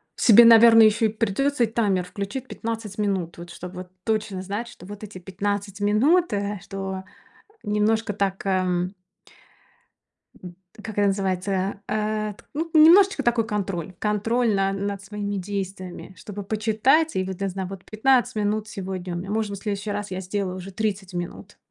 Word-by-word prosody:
Себе, 235 +1 +7
наверное, 225 -1 +8
ещё 225 +2 +2
и 220 - +3
придётся 230 +6 0
и - - -5
таймер 205 -5 +1
включить 200 +8 -5
15 225 -3 -5
минут, 190 -5 -1
вот 175 0 -9
чтоб 180 +2 -8
вот 180 0 -8
точно 215 -3 -1
знать, 205 +5 -4
что 180 - -13
вот 205 +1 -9
эти 210 -2 -8
15 200 +2 -3
минут, 265 - +3
э, 205 0 -2
что 195 -1 -5 0.6
немножко 210 +1 +1
так, 195 -1 -1
ам 185 -1 0 1.5
м, 180 -1 -10 0.3
как 215 -1 -8
это 205 - +4
называется? 195 0 -1
А, 215 0 -1
т 205 - -19
ну, 320 +3 -2
немножечко 330 0 +7
такой 235 -2 +2
контроль. 190 -4 -3
Контроль 220 +2 +1
на 195 0 +1
над 200 0 -3
своими 205 0 -4
действиями, 190 -1 -5
чтобы 205 -1 -7
почитать. 220 +10 +2
И 185 - +1
вот, 190 -1 -5
для 195 -1 -2
зна 190 +1 -4
вот 190 0 -9
15 245 +2 +2
минут 210 +1 -1
сегодня 185 -3 -5
у - - -2
меня, 185 +3 -6
может 215 -1 -1
быть, 200 - -5
в - - -19
следующий 205 0 -3
раз 205 -1 -4
я 185 +1 -3
сделаю 190 0 -3
уже 185 +1 -8
30 195 -2 -3
минут. 175 0 -6
205 Hz, 170 wpm, -24 LUFS, 190-220 Hz, 1.5 s, наверное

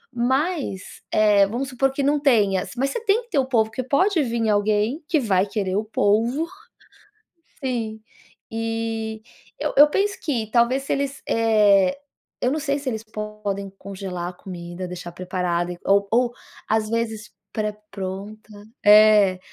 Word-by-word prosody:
mas, 265 - -1
eh, 205 -2 +4
vamos 245 +6 -3
supor 270 +1 +1
que 275 +1 -2
não 290 +2 +2
tenha, 210 -10 +2
mas 275 +2 0
você 455 - -4
tem 440 +2 +2
que 475 - -27
ter 290 - +2
o 265 - +2
polvo 220 -4 +2
que 255 - -3
pode 335 - +2
vim 235 -4 -1
alguém 210 +7 +1
que 320 -3 +2
vai 200 -6 +1
querer 195 -2 -2
o 210 - +1
polvo. 225 +7 +1 1.2
Sim. 230 -4 -3 0.5
E 225 -1 -3 0.4
eu - - -2
eu 290 +2 +8
penso 395 +5 0
que 240 -9 -2
talvez 240 +4 +3
se 275 - -3
eles, 280 0 -2
eh, 210 -2 +4 0.4
eu 250 - +1
não 300 - -1
sei 280 -2 -1
se 275 - -4
eles 220 -3 -3
podem 210 -2 -5
congelar 185 -3 -5
a - - -10
comida, 180 0 -8
deixar 175 -1 -7
preparada, 180 -1 -2
e 175 - -10
ou 200 0 +4
ou 240 +1 +2 0.4
às 215 0 +1
vezes 225 -2 -2 0.2
pré-pronta, 210 0 -6 0.3
é 210 -2 +7
220 Hz, 155 wpm, -23 LUFS, 200-260 Hz, 1.2 s, eu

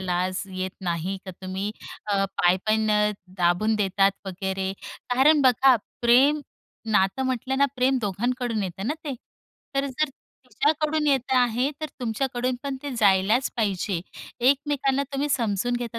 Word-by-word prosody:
लाज 185 +1 -1
येत 185 0 -2
नाही 175 +1 -2
का 190 - -6
तुम्ही 190 +2 -3 0.4
अ, 195 -1 +2
पाय 185 -2 +2
पण 215 0 +2
अ, 210 0 +3 0.3
दाबून 180 +5 +2
देतात 195 -1 +2
वगैरे 190 0 -3 0.4
कारण 290 +4 +5
बघा 260 +1 +5 0.3
प्रेम 270 +6 +5 0.5
नातं 195 +5 +2
म्हटलं 260 +1 -1
ना, 280 - +5
प्रेम 260 +1 +2
दोघांकडून 230 +2 -1
येतं 190 +2 -5
ना 295 - 0
ते. 280 - -3 0.6
तर 275 +1 +1
जर 280 +3 -1 0.4
तिच्याकडून 305 +2 +1
येत 265 -2 +1
आहे, 250 +2 +2
तर 310 - -2
तुमच्याकडून 245 +1 -1
पण 275 -1 -3
ते 285 - -4
जायलाच 205 +4 +3
पाहिजे. 195 -4 -1 0.5
एकमेकांना 280 -1 +1
तुम्ही 280 +2 -1
समजून 235 -2 0
घेता. 235 -1 -5
230 Hz, 145 wpm, -25 LUFS, 195-265 Hz, 0.6 s, कारण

